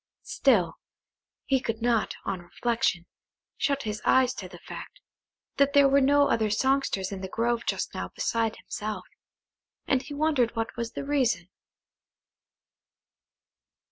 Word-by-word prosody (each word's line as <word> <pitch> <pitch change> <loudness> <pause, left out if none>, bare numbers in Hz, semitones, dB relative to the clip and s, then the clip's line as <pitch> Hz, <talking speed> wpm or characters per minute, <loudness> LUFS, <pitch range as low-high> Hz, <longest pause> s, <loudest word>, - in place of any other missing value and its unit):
Still, 185 -12 +2 0.7
he 270 -1 +2
could 225 -3 -3
not, 235 -1 +1
on 190 -3 -2
reflection, 185 -2 -1 0.5
shut 280 -2 0
his 210 -1 -4
eyes 260 -1 +4
to 185 - -7
the 175 - -11
fact, - - -10 0.6
that 280 0 +3
there 285 -1 +7
were 275 +1 +4
no 285 +1 +5
other 220 -2 +1
songsters 235 -4 +1
in 195 -1 -5
the 190 - -4
grove 235 +2 -1
just - - -1
now - - -3
beside 225 -1 0
himself, 210 -3 -5 0.8
and 265 -2 +2
he 290 +2 -8
wondered 285 -6 +1
what 225 0 -3
was 235 -1 -4
the - - -5
reason. 245 -12 +1
235 Hz, 140 wpm, -27 LUFS, 210-275 Hz, 0.8 s, there